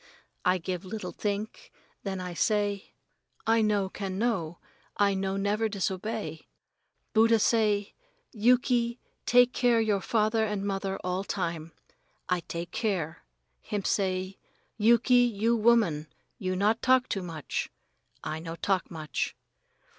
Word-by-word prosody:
I 180 +1 +3
give 180 +1 -4
little 215 +3 -5
think, 210 +1 -4 0.3
then 195 -2 -4
I 180 -1 -5
say, 205 +1 0 0.5
"I 225 0 +4
no 205 -2 +2
can 190 -1 -5
know 190 -8 -1 0.4
I 200 -1 +3
no 190 0 -1
never 210 +3 0
disobey. 195 -3 -3 0.7
Buddha 225 +1 +5
say, 210 -2 +2 0.4
'Yuki, 240 +1 +2 0.3
take 245 0 +5
care 225 -5 +2
father 220 +2 +1
and 205 -2 -2
mother 195 -1 -2
all 185 +1 -1
time.' 170 -5 -3 0.5
I 180 -1 +1
take 170 0 -6
care. 185 -8 -2 0.4
Him 205 -2 -3
say, 185 -1 -1 0.4
'Yuki, 235 +3 +4
you 235 -1 +3
woman 215 -10 +3 0.3
you 185 -3 -1
not 210 +4 +2
talk 255 -1 +4
too 195 - -2
much.' 165 -4 -4 0.5
I 155 - -3
no 165 0 -6
talk 190 +1 0
much. 155 -2 -3
200 Hz, 125 wpm, -28 LUFS, 185-225 Hz, 0.7 s, Buddha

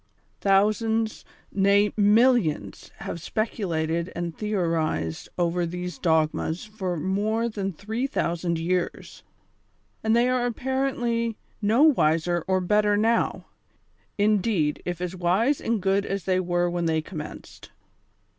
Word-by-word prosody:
Thousands, 215 +3 +1 0.3
nay, 200 +1 +3
millions 215 - +2
have 170 - -5
speculated 170 -5 -2
and 170 -2 -4
theorized 165 - -1
over 175 0 +1
these 180 -1 -5
dogmas 160 +1 0
for 195 -5 -4
more 210 +7 0
than 200 -4 -3
tliree 220 - -3
thousand 170 -6 -1
years, 175 +2 -2 0.8
and 220 +1 +3
they 240 +1 +4
are 250 -1 +1
apparently 240 -2 -1 0.2
no 220 +7 +3
wiser 175 - +3
or 190 0 +2
better 210 +2 +2
now; 225 +2 +1 0.7
indeed, 205 -6 +1
if 175 -1 -4
as 180 0 -3
wise 190 +11 +1
and 230 -1 0
good 195 +1 +1
as 195 -2 -3
they 185 -1 +1
were 175 -1 +1
when 175 0 -1
they 160 -1 +1
commenced. 155 -4 -9
195 Hz, 120 wpm, -25 LUFS, 170-220 Hz, 0.8 s, they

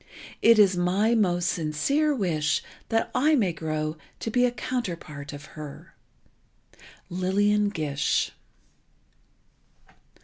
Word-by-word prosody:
It 230 0 +6
is 195 -3 +6
my 190 +6 +2
most 175 -6 +2
sincere 185 - +1
wish 160 - 0 0.3
that 225 0 0
I 305 +4 +3
may 200 -10 +1
grow 155 -1 -3 0.2
to 225 - -3
be 245 +2 +3
a 245 - +1
counterpart 170 - -5
of 145 0 -9
her. 150 -2 -10 1.2
Lillian 205 +3 +2
Gish." 150 -6 0
185 Hz, 105 wpm, -26 LUFS, 155-225 Hz, 1.2 s, It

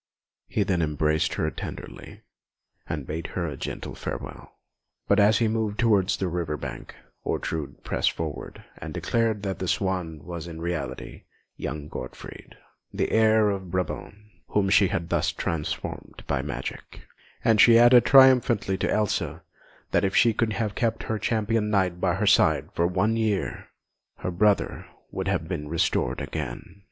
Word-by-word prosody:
He 105 - 0
then 95 -4 0
embraced 75 0 +1
her - - -1
tenderly, - - -8 0.7
and 75 -4 -4
bade 80 +4 -4
her 85 - 0
a 75 -4 -4
gentle - - -6
farewell. - - -7 0.5
But 100 - +4
as 105 +1 +5
he 115 - +2
moved 110 -1 -1
towards 100 -5 +3
the 95 - -1
river 85 -3 -2
bank, 65 -4 -7 0.3
Ortrud 80 -4 -3
pressed - - +1
forward 80 -3 -6 0.2
and 80 -1 -7
declared 110 +3 0
that 95 -1 -3
the 95 - -3
swan 90 -6 -1
was 85 -1 -6
in 80 -1 -8
reality 85 +1 -5 0.3
young 75 -1 -5
Gottfried, 65 - -9 0.4
the - - -1
heir 110 -1 +4
of 95 -2 -5
Brabant, 90 +2 -3 0.3
whom 100 -2 +1
she 100 0 +6
had 85 -1 -3
thus - - +1
transformed 80 -3 -4
by - - 0
her - - -2
magic; 60 +2 -6 0.4
and 110 -2 +5
she 115 -1 +8
added 120 0 +7
triumphantly 125 -7 +5
to - - 0
Elsa 105 -2 -1 0.5
that - - +2
if 95 0 0
she 115 -2 +5
could 110 0 0
have 105 -1 -2
kept 115 +2 -1
her 110 -1 -2
Champion 110 -1 0
Knight 95 -4 +1
by 90 -2 +2
her 100 +2 -1
side 100 - +4
for 85 - +2
one 110 +5 +1
year, 110 -4 -1 0.5
her 90 - -3
brother 100 +3 +1 0.2
would 95 0 -3
have 85 -4 -1
been 80 -5 -4
restored 85 +1 0
again. 75 +5 -6
95 Hz, 160 wpm, -26 LUFS, 85-110 Hz, 0.7 s, she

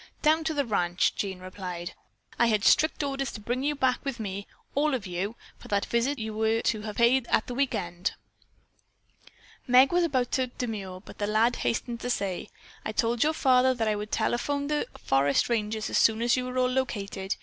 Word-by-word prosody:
"Down 315 +1 +4
to 320 -1 -1
the 285 -1 +1
ranch," 180 -5 +1
Jean 190 -2 -3
replied. 185 -1 -6 0.5
"I 235 - +5
had 215 -3 +2
strict 315 -1 +4
orders 275 -2 -2
to - - -6
bring 240 +5 -2
you 295 +2 0
back 260 -2 +1
with 270 -4 -4
me, 200 -2 -5 0.3
all 295 0 +2
of 230 -6 -5
you, 190 +5 -3 0.2
for - - -12
that 200 -1 0
visit 235 +5 +1
that 245 - -8
you 220 0 -4
were 220 +1 +1
to 215 - 0
have 210 -1 -6
paid 235 +1 +3
at - - +2
the 245 - -5
weekend." 180 -9 -1 1.5
Meg 255 +2 +6
was 350 0 +3
about 260 -7 0
to 260 -1 +1
demur, 205 -7 -5
but - - -13
the 205 - 0
lad 220 +3 +2
hastened 235 0 -2
to 245 - -4
say: 200 -4 -2 0.3
"I - - -3
told 230 +2 +1
your 310 +1 +2
father 260 -3 +4
that 225 -2 -1
I 215 - +2
would 210 +1 -5
telephone 280 +6 0
the 300 +9 0
forest 140 - +2
ranger 220 -2 0
as 215 - 0
soon 225 +1 +3
as 240 - +4
you 255 -1 -2
all 250 - -5
were 255 0 +2
located. 200 -7 -2
235 Hz, 205 wpm, -27 LUFS, 205-260 Hz, 1.5 s, Meg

